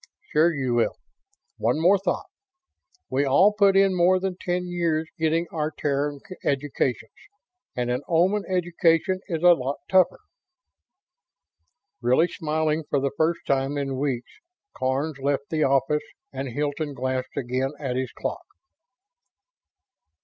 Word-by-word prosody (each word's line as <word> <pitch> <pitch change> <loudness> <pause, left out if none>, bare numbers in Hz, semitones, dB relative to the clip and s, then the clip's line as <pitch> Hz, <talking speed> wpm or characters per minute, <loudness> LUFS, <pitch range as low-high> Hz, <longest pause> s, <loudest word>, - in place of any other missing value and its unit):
"Sure 160 +3 +4
you 130 -6 -1
will. 120 -1 +1 0.6
One - - +1
more 185 +5 +5
thought. 180 -2 -2 0.9
We 135 +2 +2
all 180 +10 +5
put 200 -2 +4
in 195 -1 +4
more 180 +1 +4
than 190 -1 -2
ten 180 0 -2
years 165 -3 0
getting 160 +1 +1
our 155 -2 -1
Terran 145 -1 -2 0.2
educations, 135 -3 -1 0.6
and 125 0 -1
an 125 +2 -1
Oman 185 +5 +3
education 175 0 +2
is 165 -3 -3
a 175 0 +8
lot 135 -2 -3
tougher." 185 -2 +3 1.8
Really 130 +8 +3
smiling 155 -1 -1
for 140 - +2
the 140 0 -1
first 165 +2 +1
time 135 +1 0
in 135 -2 -2
weeks, 130 -4 -2 0.4
Karns 140 +3 -1
left 140 +1 -1
the 155 -1 +1
office 140 +2 +2 0.3
and 135 +1 -4
Hilton 145 +3 -3
glanced 130 +1 -3
again 130 +1 -1
at 135 -4 -3
his 130 0 -2
clock. - - -5
150 Hz, 135 wpm, -25 LUFS, 135-175 Hz, 1.8 s, a